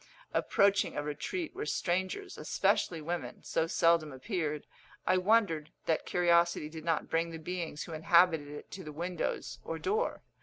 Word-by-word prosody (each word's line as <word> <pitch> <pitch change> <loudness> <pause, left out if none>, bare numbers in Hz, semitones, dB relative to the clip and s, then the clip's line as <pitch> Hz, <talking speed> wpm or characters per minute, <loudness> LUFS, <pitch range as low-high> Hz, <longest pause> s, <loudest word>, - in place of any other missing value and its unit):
Approaching 200 -4 +3
a 145 - 0
retreat 315 - -3
where 425 +3 -4
strangers, 190 - -1
especially 165 -3 +1
women, 170 +3 -4
so 160 - 0
seldom 165 -2 +3
appeared, 150 - -3 0.4
I 185 - +4
wondered 185 -6 +3 0.2
that 160 - 0
curiosity 170 -3 +3
did 160 0 -8
not 165 -1 0
bring 165 +1 +1
the 165 - -6
beings 165 -2 -4
who 165 - -8
inhabited 165 -1 +4
it 145 0 -9
to 190 - -7
the 150 - -7
windows 170 +3 -3
or 165 - -4
door. 440 - -1
170 Hz, 155 wpm, -32 LUFS, 155-185 Hz, 0.4 s, I